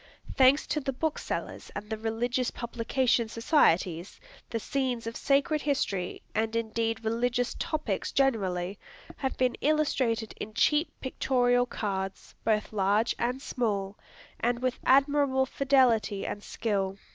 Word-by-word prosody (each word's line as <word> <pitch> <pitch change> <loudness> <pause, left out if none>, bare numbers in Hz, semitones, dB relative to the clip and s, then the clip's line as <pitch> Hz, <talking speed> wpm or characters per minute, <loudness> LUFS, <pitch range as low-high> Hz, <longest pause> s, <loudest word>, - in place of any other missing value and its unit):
Thanks 265 +2 +5
to 300 - -1
the 270 -2 -3
booksellers 315 +4 -3
and 210 - -5
the 220 - -2
religious 235 +3 -1
publication 235 0 0
societies, 185 - +2 0.3
the 230 - -2
scenes 255 -1 -2
of 230 +1 -5
sacred 285 +2 +2
history, 195 -11 -1
and 220 +1 0
indeed 225 0 -1
religious 245 +2 0
topics 310 -1 -2
generally, 195 -8 0 0.4
have 265 -1 -3
been 255 -1 +2
illustrated 260 -7 +1
in 215 0 -6
cheap 300 +6 +3
pictorial 245 -2 +2
cards, 195 -4 -4
both 215 -1 0
large 205 +3 +2
and 250 +3 -1
small, 205 -7 -2 0.4
and 240 +1 +1
with 255 0 -2
admirable 275 0 +4
fidelity 255 -8 +2
and 205 - -4
skill. 195 -3 -2
235 Hz, 125 wpm, -28 LUFS, 215-265 Hz, 0.4 s, Thanks